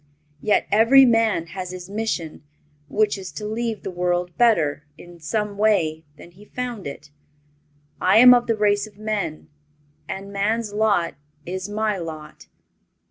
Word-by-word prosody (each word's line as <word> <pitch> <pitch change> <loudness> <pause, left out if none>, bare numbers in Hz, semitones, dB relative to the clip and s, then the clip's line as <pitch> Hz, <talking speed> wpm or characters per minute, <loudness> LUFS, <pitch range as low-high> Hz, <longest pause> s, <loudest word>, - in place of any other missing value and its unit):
Yet 210 - +2
every 230 +6 +6
man 225 -7 +2
has 185 -2 -5
his 180 -1 -8
mission, 200 -7 -4 0.5
which 210 +1 +1
is 185 - -8
to 210 - -6
leave 225 0 -3
the - - -4
world 175 0 -1
better, 165 -12 +2
in 175 +1 -14
some 210 +3 -3
way, 160 -7 +1
than 170 - -14
he 190 +4 -17
found 240 - -5
it. 145 +1 -10 0.9
I 185 +3 +4
am 250 +2 +9
of 245 -1 +2
the 225 -2 0
race 205 0 +1
of 205 -2 -18
men, 210 -7 -4 0.6
and 200 +1 -6
man's 210 +2 -1
lot 205 -5 +1 0.3
is 185 +2 -5
my 210 -1 -1
lot. 155 -2 -9
205 Hz, 150 wpm, -22 LUFS, 175-220 Hz, 0.9 s, am